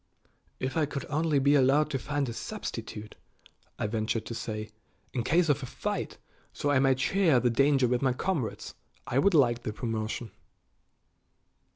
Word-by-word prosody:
"If 130 +1 -3
I 155 -2 +2
could 140 -1 -5
only 155 0 +1
be 140 +1 +4
allowed 140 +2 +4
to 135 - -1
find 145 0 -2
a 115 - -4
substitute," 105 -1 -6 0.6
I - - -2
ventured 110 0 -1
to - - -5
say, 110 -2 -5 0.4
"in 120 - -1
case 165 +7 +3
of 145 -1 +2
a 130 - -5
fight, - - -4 0.3
so 145 - -1
I 135 - +4
might 135 -1 +3
share 165 -3 +3
the 120 -1 +2
danger 135 +1 +3
with 125 0 0
my 130 -2 +2
comrades, 145 - -3 0.3
I 125 - +1
would 195 +4 +3
like 120 -5 +4
the 110 - -3
promotion." 110 0 -4
130 Hz, 170 wpm, -29 LUFS, 115-145 Hz, 0.6 s, be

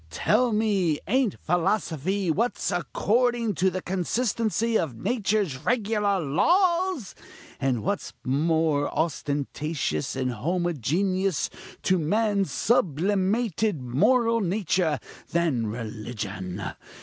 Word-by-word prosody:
tell 250 -1 +2
me, 200 -7 +1
ain't 245 0 +1
philosophy 175 +1 0
what's 230 +7 0
according 230 +5 +1
to 190 +2 +2
the 185 0 -4
consistency 225 +4 0
of 155 - 0
nature's 205 - 0
regular 210 -2 +1
laws? 340 - +2 0.5
and 130 -5 0
what's 200 - -2
more 155 +1 +1
onsentaneous 145 - -2
and 130 -1 -1
homogeneous 175 - 0 0.3
to 185 -1 +3
man's 200 +3 +1
sublimated 200 - +1
moral 230 - +2
nature, 180 -5 +1 0.4
than 155 -10 +1
religion? 105 -4 -5
185 Hz, 90 wpm, -26 LUFS, 145-215 Hz, 0.5 s, to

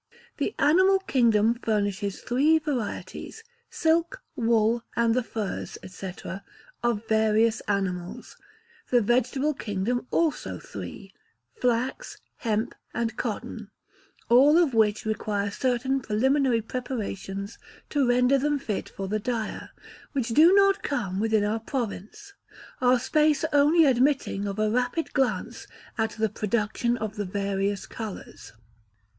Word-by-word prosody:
The - - -2
animal 375 +5 +5
kingdom 235 - +2
furnishes 205 -2 -1
three 290 +6 +3
varieties 300 - -4 0.3
silk, 335 +9 0
wool, 230 0 +2
and 230 -1 +3
the 255 - +2
furs, 220 -4 -5
&c., 185 0 -7 0.7
of 230 -2 -1
various 220 +1 +3
animals; 195 +2 -3 0.5
the 245 - +4
vegetable 255 +6 +1
kingdom 235 +1 -2
also 325 -3 0
three - - -9 0.4
flax, 255 - -1 0.2
hemp, 220 0 -1 0.2
and 230 -1 -1
cotton: - - -5 0.6
all 275 +6 +6
of 335 -7 +3
which 220 0 +2
require 205 -2 -1
certain 260 +3 0
preliminary 255 +1 +1
preparations 210 -5 -5 0.3
to 285 -4 +2
render 250 +3 +4
them 295 +2 +1
fit 220 -7 -4
for 195 - -6
the 215 +2 -1
dyer, 225 -1 -3 0.4
which 260 -4 -1
do 310 +9 +6
not 395 0 +4
come 195 -10 -2
within 220 -1 +2
our 215 +2 0
province, 245 - -5 0.5
our 250 0 +5
space 300 +4 +2
only 300 +3 +5
admitting 260 -6 +1
of 200 0 -4
a 215 0 +1
rapid 250 +7 -1
glance 265 -3 -1 0.3
at 220 -1 0
the 220 0 0
production 215 +3 -1
of 215 -1 -5
the 205 - -2
various 200 0 -2
colours. 220 -4 -8
235 Hz, 125 wpm, -26 LUFS, 210-270 Hz, 0.7 s, all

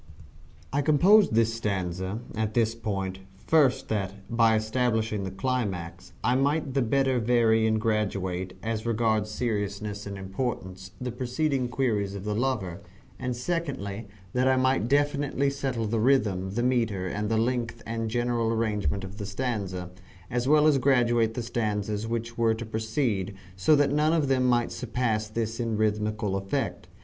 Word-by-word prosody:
I 145 - +2
composed 175 - +5
this 115 0 +3
stanza, 95 -2 -2
at 110 -1 -2
this 115 -2 +3
point, 95 -5 -3 0.2
first 135 +1 +2
that, 100 -3 -1 0.2
by 115 -1 +5
establishing 110 -2 0
the - - -3
climax, 95 -5 -3
I 120 - +3
might 140 +2 +1
the 135 - +2
better 130 +1 +2
vary 115 -1 +3
and 110 0 +2
graduate, 95 -5 -1
as 115 0 -2
regards 110 -2 +1
seriousness 105 -2 -3
and 100 -1 -5
importance, 95 -2 -4
the 125 -1 -3
preceding 130 +2 -1
queries 110 -6 0
of 100 - -6
the 105 0 -2
lover, 105 -7 -1 0.4
and 125 -1 -2
secondly, 120 - -3 0.3
that 125 +1 +2
I 130 - +4
might 130 -3 +2
definitely 140 0 +1
settle 135 -5 -2
the 110 +1 0
rhythm, 105 -6 +2
the 120 - +1
metre, 115 -7 +1
and 105 +3 -2
the 115 - +1
length 115 0 -1
and 115 0 -2
general 120 -1 0
arrangement 105 -5 0
of 95 +1 -8
the 105 - -5
stanza, 100 -6 -3 0.4
as 120 +1 0
well 150 +1 +5
as 150 -3 +5
graduate 120 -4 +3
the 120 - -2
stanzas 105 -2 -2
which 115 +1 -4
were 115 -1 +3
to 115 +1 -6
precede, 110 -3 -1 0.2
so 95 +12 +4
that 145 -1 +3
none 150 +2 +3
of 155 -5 +1
them 130 -1 +3
might 120 -1 +2
surpass 115 -3 -1
this 115 +1 -3
in 115 -2 -1
rhythmical 105 -1 0
effect. 95 0 -3
115 Hz, 160 wpm, -27 LUFS, 105-125 Hz, 0.4 s, composed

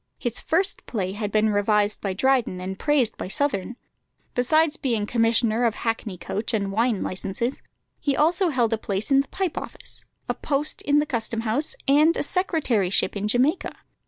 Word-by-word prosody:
His 240 -1 -3
first 370 +6 0
play 190 -5 -2
had 205 +1 -4
been 215 +1 +3
revised 205 0 +1
by 195 -2 -2
Dryden 250 -3 +1
and 190 +1 -5
praised 285 -7 +2
by - - -5
Southerne. 250 -2 -1 0.6
Besides 310 +5 +2
being 230 -9 -1
commissioner 230 0 +2
of 230 -3 +2
hackney 225 -4 -3
coach 210 +5 -2
and 200 -2 -1
wine 225 0 +1
licences, 195 +7 -2 0.4
he 280 -2 0
also 340 +4 +3
held 240 -6 +1
a 220 - -1
place 200 +5 -3
in 275 0 +6
the 275 - -9
Pipe 380 -4 -2
Office, - - -9 0.2
a - - 0
post 295 +1 -1
in 290 0 +2
the 295 - +3
Custom 230 -4 -2
House, 235 +7 -1
and 300 +4 +4
a - - 0
secretaryship 285 - +1
in 205 +1 -2
Jamaica. 260 - +1
235 Hz, 175 wpm, -24 LUFS, 210-290 Hz, 0.6 s, in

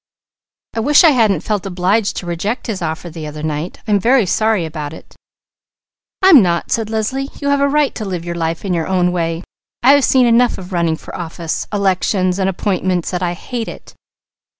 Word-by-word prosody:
"I - - -1
wish 295 +9 +5
I 325 - +7
hadn't 225 -7 +2
felt 210 -3 -1
obliged 195 +3 0
to - - -5
reject 175 +8 -3
his 210 -6 -4
offer 160 +1 -4
the 155 -1 -7
other 150 0 -7
night. 155 +3 -4
I'm 205 -2 +3
very 240 +2 +3
sorry 215 -1 +1
about 155 -2 -6
it." - - -14 1.1
"I'm 355 -9 +8
not," 170 -3 0
said 225 -2 0
Leslie. 240 +5 -2
"You 285 - -1
have 280 0 +2
a 280 - +4
right 290 0 +1
to 220 - -5
live 180 -4 -4
your 175 - -3
life 165 +1 -3
in 190 - -1
your 165 -2 -1
own 180 -1 +1
way. 165 -1 -2 0.4
I 260 - +7
have 285 -1 +5
seen 255 -1 +4
enough 235 +1 +3
of 185 0 -9
running 170 -2 +1
for - - -11
office, 165 -1 -4
elections 190 -2 0
and 190 0 +1
appointments 185 -2 -1
that 180 -1 -3
I 175 -1 0
hate 230 +6 -5
it. - - -10
190 Hz, 200 wpm, -17 LUFS, 170-225 Hz, 1.1 s, I'm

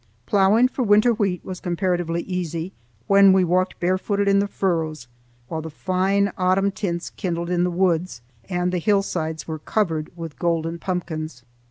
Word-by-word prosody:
Ploughing 205 +5 +4
for 260 - -4
winter 215 +1 +4
wheat 195 -5 -1
was 185 -1 -6
comparatively 175 -1 -1
easy, 175 -1 -4 0.3
when 200 +2 +6
we 190 -1 +4
walked 185 +2 0
barefooted 190 +3 0
in 200 0 +4
the 200 - +1
furrows, 160 -9 -2 0.4
while 160 +3 -4
the 160 - -6
fine 190 +4 0
autumn 190 +2 +2
tints 175 -4 -3
kindled 170 -2 -3
in 175 0 +2
the 180 - +1
woods, 175 -5 0 0.3
and 180 -1 0
the 180 - 0
hillsides 165 -6 -1
were 160 -1 -4
covered 160 -4 -1
with 165 -3 -8
golden 165 -1 -1
pumpkins. 160 -7 -4
180 Hz, 160 wpm, -23 LUFS, 165-195 Hz, 0.4 s, when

